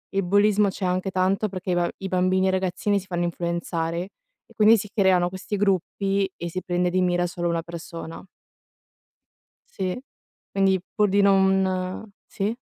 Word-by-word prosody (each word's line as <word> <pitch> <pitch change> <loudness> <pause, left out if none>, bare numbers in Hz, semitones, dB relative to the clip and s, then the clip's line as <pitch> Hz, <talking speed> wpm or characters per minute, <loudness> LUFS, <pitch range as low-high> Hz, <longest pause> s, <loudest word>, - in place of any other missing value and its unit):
il 195 - +2
bullismo 205 +2 +3
c'è 190 0 -4
anche 185 +1 -1
tanto 190 +3 +1
perché 185 -1 -5
i - - +2
ba 175 0 +1
i 195 - -5
bambini 185 +1 +2
e - - +3
ragazzini 190 +2 0
si 190 - -12
fanno 175 -2 -2
influenzare 170 -1 -2 0.5
e 230 - -20
quindi 220 +1 +6
si 210 0 -5
creano 185 -4 +3
questi 190 +2 -5
gruppi 195 0 0
e 170 0 -5
si 185 +2 -4
prende 180 0 0
di 185 +1 +1
mira 175 -1 +1
solo 175 -1 -3
una 170 0 0
persona. 165 -1 -8 1.5
Sì. 185 +1 -2 0.5
Quindi 195 -2 +2
pur 210 -1 +3
di 200 +1 +3
non 190 -1 +2 0.2
sì. 200 +3 -2
185 Hz, 165 wpm, -24 LUFS, 175-195 Hz, 1.5 s, quindi